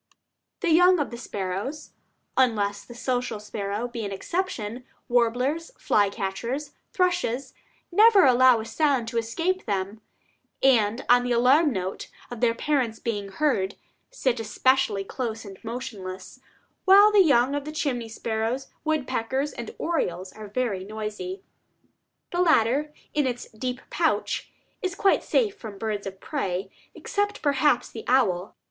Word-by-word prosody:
The 345 -4 +1
young 360 +3 +6
of 290 -5 -2
the 235 - -6
sparrows, 205 +8 -4 0.4
unless 205 -6 +1
the 240 - -12
social 245 -3 -2
sparrow 210 +2 -3
be 235 -2 -5
an 200 - -4
exception, 240 - -3 0.2
warblers, 250 +6 +1
fly 205 -1 +2
catchers, 235 +8 -4 0.2
thrushes, 335 -9 0 0.4
never 420 0 +7
allow 255 -2 +6
a 220 - -5
sound 275 -3 +1
to 230 -1 0
escape 330 +11 -2
them; 200 +1 -2 0.6
and 235 -3 +3
on 245 +1 +6
the 245 0 0
alarm 270 +6 +4
note 190 -3 -4 0.2
of 245 -1 -7
their 230 -2 +3
parents 255 -5 0
being 205 -4 -3
heard, 200 -5 0 0.3
sit 260 - -1
especially 225 -2 +1
close 225 +1 -4
and 195 -2 -11
motionless, 220 -4 -7 0.5
while 400 +2 +8
the 415 -2 +6
young 275 -5 +4
of 290 +1 -3
chimney 265 -7 -2
swallows, 225 +3 -2
woodpeckers, 270 -2 -1
and 235 -2 -6
orioles 185 - -2
are 215 -1 -9
very 205 -4 -2
noisy. 215 - -5 0.9
The 355 - +1
latter, 295 -2 +3 0.2
in 295 -3 +2
its 245 -1 -4
deep 250 +3 -4
pouch, - - 0 0.3
is 375 -2 -2
quite 390 - +3
safe 425 -4 0
from 215 -3 -8
birds 210 -1 -3
of 190 0 -8
prey, 195 - -3 0.2
except 410 0 -2
perhaps 285 -2 +2
the 225 - -7
owl. 205 -8 +2
245 Hz, 140 wpm, -25 LUFS, 215-295 Hz, 0.9 s, while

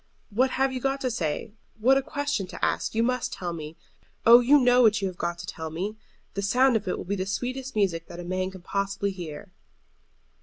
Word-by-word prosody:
What 255 +6 +3
have 265 0 +2
you 255 - -2
got 270 +1 0
to 255 - 0
say? 165 -5 -2 0.3
What 255 +5 +5
a 270 - +3
question 285 -7 -2
to - - -2
ask! - - -1
You 225 - +3
must 250 0 0
tell 175 -2 -4
me. 155 -1 -7 0.5
Oh, 235 +1 +10
you 275 +4 +5
know 250 -1 +5
what 220 -2 +5
you 195 - -1
have 185 - -6
got 170 0 -2
to - - -7
tell 160 -1 -6
me! 185 +7 -4 0.4
The 200 - -2
sound 250 +5 +3
of 215 -3 -1
it 180 - -1
will - - -6
be 200 +3 -1
the 190 -1 -3
sweetest 255 +5 -3
music 180 -6 0
that 170 - -9
a - - -5
man 185 +1 -2
can 190 -2 -12
possibly 200 +1 -1
hear." 180 +1 -8
200 Hz, 230 wpm, -26 LUFS, 180-250 Hz, 0.5 s, Oh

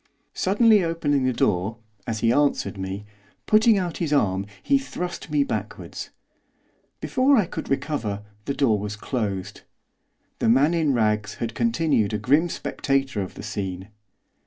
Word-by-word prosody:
Suddenly 210 +1 +4
opening 145 -5 0
the 130 - +2
door, 105 +1 0 0.3
as 110 -2 -2
he 115 +1 +3
answered 145 -5 +1
me, 95 +1 -5 0.4
putting 215 0 +5
out 180 -4 -2
his 165 -4 -2
arm 100 -8 +1 0.2
he 275 0 +3
thrust 180 -11 -5
me 150 -1 +2
backwards. - - -5 0.9
Before 270 +2 +3
I 210 - +3
could - - -6
recover 135 -8 -2 0.2
the 140 - -2
door 115 -7 +2
was 105 +1 -4
closed. 105 -4 -3 0.8
The - - +2
man 140 +7 +4
in 155 -5 +2
rags 110 -2 +1
had 115 -1 -4
continued 160 - +1
a - - +1
grim 150 +9 +2
spectator 135 -8 -1
of 95 - -6
the - - -8
scene. 95 -2 -4
135 Hz, 150 wpm, -24 LUFS, 105-165 Hz, 0.9 s, putting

